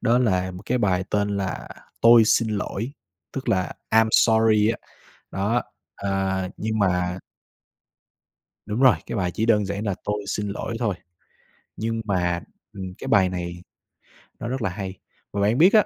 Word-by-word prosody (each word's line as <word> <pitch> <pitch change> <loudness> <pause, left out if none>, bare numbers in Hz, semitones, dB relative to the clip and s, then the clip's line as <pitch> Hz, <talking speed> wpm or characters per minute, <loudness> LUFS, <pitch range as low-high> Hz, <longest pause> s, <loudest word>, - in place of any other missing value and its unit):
đó 120 +2 +3
là 95 -7 +1
một 90 +2 -9
cái 125 +1 +1
bài 95 -4 +1
tên 105 -1 +1
là 95 -2 -3 0.3
"Tôi 115 -1 +8
xin 115 0 +3
lỗi", 110 +4 -3 0.4
tức 135 - -5
là 95 -1 +1 0.2
"I'm 110 0 +5
sorry" 110 -2 +5
á. 115 - -2 0.5
Đó, 105 +5 0 0.3
ờ, 95 -1 -1
nhưng 110 0 -2
mà 90 -2 +1 1.5
Đúng 105 +3 -2
rồi, 130 -6 +7
cái - - -4
bài 90 -3 0
chỉ 110 +5 -1
đơn 105 -3 +4
giản 100 +2 -3
là 100 -3 0
"Tôi 105 0 -2
xin 105 0 -2
lỗi" 110 +3 -4
thôi, 110 -6 0 0.8
nhưng 115 +1 -2
mà, 90 -4 0 0.3
ừm, 95 -2 -7
cái - - -6
bài 95 -2 +5
này 90 -1 -5 0.8
nó 115 - -3
rất 130 0 -3
là 95 - 0
hay. 95 0 -5 0.4
Và 100 - -2
bạn 105 +5 +2
biết 180 +5 +7
á 215 -2 +6
105 Hz, 170 wpm, -24 LUFS, 95-115 Hz, 1.5 s, Tôi